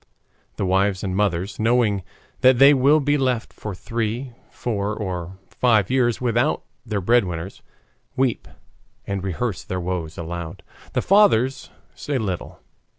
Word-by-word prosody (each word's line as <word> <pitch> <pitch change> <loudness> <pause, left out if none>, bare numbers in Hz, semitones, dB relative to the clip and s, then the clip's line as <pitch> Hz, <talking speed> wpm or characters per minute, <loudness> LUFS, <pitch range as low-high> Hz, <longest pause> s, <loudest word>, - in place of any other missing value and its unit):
The 100 - -2
wives 95 +1 +1
and 95 -2 -2
mothers, 95 -1 -1
knowing 110 -3 +2 0.4
that 130 -1 +5
they 140 +3 +8
will 140 +3 +4
be 145 0 +1
left 125 -4 -1
for 105 -3 -6
three, 115 +5 -3 0.2
four, 105 -3 -3
or 95 -3 -5
five 110 -5 +2
years 120 -3 +2
without 120 +3 +1 0.2
their 105 -4 -2
breadwinners, 95 -4 0 0.5
weep 130 -2 0 0.6
and 100 -1 -3
rehearse 95 +1 -2
their 90 0 -4
woes 90 -2 -4
aloud. 85 +2 -6 0.3
The - - 0
fathers 160 - +3 0.2
say 145 -2 -3
little. 95 -7 -4
105 Hz, 135 wpm, -22 LUFS, 95-125 Hz, 0.6 s, they